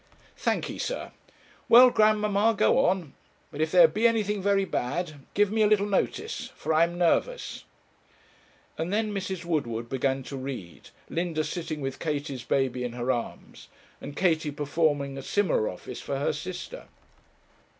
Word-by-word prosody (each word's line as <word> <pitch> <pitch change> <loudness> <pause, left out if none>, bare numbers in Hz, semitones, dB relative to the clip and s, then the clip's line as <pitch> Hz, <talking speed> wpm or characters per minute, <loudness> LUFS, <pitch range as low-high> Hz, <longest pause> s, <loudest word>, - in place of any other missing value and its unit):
'Thankee, - - -2
sir. - - -4 0.6
Well, 245 +2 +9
grandmamma, 215 0 +3
go - - +4
on; 175 -6 -1 0.4
but 145 - -5
if 155 0 0
there 175 -2 +8
be 215 +9 +2
anything 210 -3 0
very 200 0 +2
bad, 155 0 -3 0.2
give 205 0 +3
me 220 0 +1
a 210 - +5
little 205 -1 +3
notice, 400 - -2
for - - -2
I 160 +2 +5
am 170 +1 -6
nervous.' 335 - 0 1.1
And 165 +3 -2
then 215 0 0
Mrs. 190 -3 -4
Woodward 120 -9 -2
began 135 0 -1
to 135 +1 -7
read, 130 -10 -7 0.2
Linda 165 -2 -1
sitting 160 -3 -4
with 135 -1 -4
Katie's 145 -4 -3
baby 130 -1 0
in 120 -1 -4
her 125 +1 -1
arms, 120 -2 -6 0.3
and 145 - -8
Katie 160 -4 +2
performing 145 -1 -1
a - - -6
similar 440 - +1
office - - -8
for - - -3
her 480 - 0
sister. - - -7
170 Hz, 155 wpm, -27 LUFS, 140-205 Hz, 1.1 s, Well